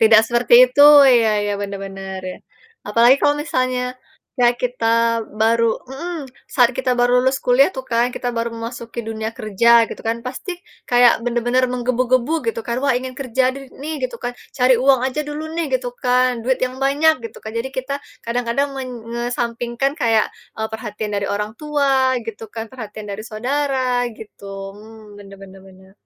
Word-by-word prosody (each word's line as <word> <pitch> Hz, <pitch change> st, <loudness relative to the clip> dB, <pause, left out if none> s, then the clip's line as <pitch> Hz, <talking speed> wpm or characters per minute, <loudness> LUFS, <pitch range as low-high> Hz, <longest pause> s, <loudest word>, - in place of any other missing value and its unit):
Tidak 220 Hz, -1 st, +7 dB
seperti 240 Hz, 0 st, +3 dB
itu, 255 Hz, +3 st, 0 dB, 0.3 s
iya 230 Hz, -3 st, +4 dB
iya, 205 Hz, 0 st, -1 dB
benar 200 Hz, -1 st, -4 dB
benar, 195 Hz, 0 st, -7 dB
ya. -, -, -8 dB, 0.5 s
Apalagi 235 Hz, +5 st, +5 dB
kalau 290 Hz, -, +4 dB
misalnya 255 Hz, -4 st, -1 dB, 0.6 s
ya 240 Hz, -, +6 dB
kita 245 Hz, -2 st, -1 dB, 0.5 s
baru 230 Hz, +1 st, +3 dB, 0.2 s
mmm, 320 Hz, +4 st, -6 dB, 0.3 s
saat 245 Hz, -3 st, +5 dB
kita 255 Hz, -, 0 dB
baru 245 Hz, 0 st, +3 dB
lulus 260 Hz, +1 st, +1 dB
kuliah 250 Hz, +2 st, +5 dB
tuh 260 Hz, -, -5 dB
kan, 235 Hz, +1 st, +3 dB
kita 245 Hz, -, -3 dB
baru 230 Hz, 0 st, 0 dB
memasuki 230 Hz, 0 st, -7 dB
dunia 220 Hz, 0 st, -3 dB
kerja, 215 Hz, +2 st, 0 dB, 0.2 s
gitu -, -, -8 dB
kan, 225 Hz, -, 0 dB
pasti 260 Hz, +9 st, -6 dB, 0.4 s
kayak 245 Hz, -1 st, +6 dB
bener-bener 245 Hz, +1 st, +1 dB
menggebu-gebu, 250 Hz, +2 st, 0 dB, 0.2 s
gitu 230 Hz, 0 st, -2 dB
kan, 235 Hz, -, -2 dB
wah, 280 Hz, -, +3 dB
ingin 255 Hz, 0 st, -7 dB
kerja 260 Hz, -1 st, 0 dB
de 275 Hz, -, -8 dB, 0.2 s
nih, 310 Hz, +2 st, -4 dB
gitu 250 Hz, -2 st, -3 dB
kan, 245 Hz, -, -2 dB, 0.2 s
cari 255 Hz, 0 st, +4 dB
uang 265 Hz, -1 st, +4 dB
aja 265 Hz, +3 st, -2 dB
dulu 295 Hz, +1 st, -5 dB
nih, 335 Hz, 0 st, -1 dB
gitu 250 Hz, -1 st, -6 dB
kan, 250 Hz, -1 st, +2 dB
duit 260 Hz, +2 st, +1 dB
yang 255 Hz, +1 st, -6 dB
banyak, 295 Hz, +4 st, +4 dB
gitu -, -, -15 dB
kan. 220 Hz, -, -6 dB
Jadi 240 Hz, +3 st, -3 dB
kita 260 Hz, +2 st, -3 dB, 0.3 s
kadang-kadang 240 Hz, +4 st, -1 dB
men 265 Hz, -1 st, -5 dB, 0.2 s
ngesampingkan 240 Hz, +2 st, -2 dB
kayak, 225 Hz, -3 st, +3 dB, 0.3 s
eee, 220 Hz, 0 st, -3 dB
perhatian 215 Hz, -1 st, -5 dB
dari 200 Hz, -1 st, -1 dB
orang 210 Hz, +1 st, -2 dB
tua, 275 Hz, -3 st, +1 dB
gitu 225 Hz, 0 st, -8 dB
kan, 225 Hz, -1 st, -4 dB
perhatian 215 Hz, -4 st, -8 dB
dari 200 Hz, -, -6 dB
saudara, 255 Hz, +1 st, -1 dB
gitu. 210 Hz, -2 st, -12 dB, 0.3 s
Mmm, 215 Hz, -1 st, -14 dB
benar 195 Hz, 0 st, -12 dB
benar 190 Hz, 0 st, -14 dB
benar. 190 Hz, 0 st, -18 dB
245 Hz, 175 wpm, -20 LUFS, 225-260 Hz, 0.6 s, Tidak